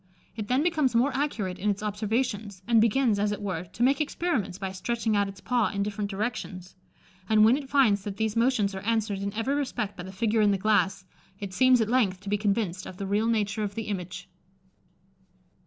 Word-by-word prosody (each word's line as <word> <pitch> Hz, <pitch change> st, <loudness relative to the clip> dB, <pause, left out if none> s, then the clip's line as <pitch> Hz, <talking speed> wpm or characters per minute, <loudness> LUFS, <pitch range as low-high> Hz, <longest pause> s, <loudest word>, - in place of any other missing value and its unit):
It 215 Hz, -3 st, -5 dB
then 255 Hz, +5 st, +2 dB
becomes 305 Hz, -8 st, +1 dB
more 255 Hz, +4 st, +2 dB
accurate 225 Hz, -10 st, -2 dB
in 210 Hz, -, 0 dB
its 200 Hz, +1 st, -2 dB
observations, 210 Hz, -2 st, -2 dB
and 230 Hz, -2 st, +5 dB
begins, 230 Hz, -1 st, +2 dB
as 205 Hz, 0 st, +1 dB
it 205 Hz, -, -3 dB
were, 185 Hz, -4 st, -3 dB
to 210 Hz, +7 st, -4 dB
make 275 Hz, +3 st, +3 dB
experiments 290 Hz, -, -1 dB
by 190 Hz, -1 st, -4 dB
stretching 220 Hz, +3 st, -1 dB
out 200 Hz, 0 st, +2 dB
its 195 Hz, 0 st, -11 dB
paw 245 Hz, -3 st, +1 dB
in 200 Hz, 0 st, -2 dB
different 205 Hz, 0 st, -3 dB
directions; 195 Hz, -3 st, -4 dB, 0.6 s
and 215 Hz, -1 st, +6 dB
when 230 Hz, +3 st, +6 dB
it 275 Hz, -2 st, -6 dB
finds 235 Hz, -9 st, +3 dB
that 200 Hz, -1 st, -5 dB
these 220 Hz, 0 st, -1 dB
motions 230 Hz, -4 st, +2 dB
are 190 Hz, -, -4 dB
answered 215 Hz, -1 st, -1 dB
in 200 Hz, +1 st, -3 dB
every 225 Hz, +5 st, 0 dB
respect 265 Hz, -8 st, -2 dB
by -, -, -7 dB
the 185 Hz, +1 st, -8 dB
figure 220 Hz, +3 st, +1 dB
in 210 Hz, -, +4 dB
the 200 Hz, -, +2 dB
glass, 195 Hz, -2 st, +1 dB, 0.3 s
it 200 Hz, -2 st, -6 dB
seems 255 Hz, +1 st, +5 dB
at 220 Hz, -, +1 dB
length 215 Hz, -6 st, +2 dB
to 200 Hz, -, -7 dB
be 205 Hz, -, +1 dB
convinced 200 Hz, -3 st, -1 dB
of 185 Hz, -, -9 dB
the 195 Hz, -, -4 dB
real 205 Hz, +3 st, +1 dB
nature 215 Hz, -2 st, 0 dB
of 205 Hz, -1 st, -3 dB
the 225 Hz, -, -3 dB
image." 185 Hz, -4 st, -5 dB
210 Hz, 215 wpm, -27 LUFS, 200-235 Hz, 0.6 s, and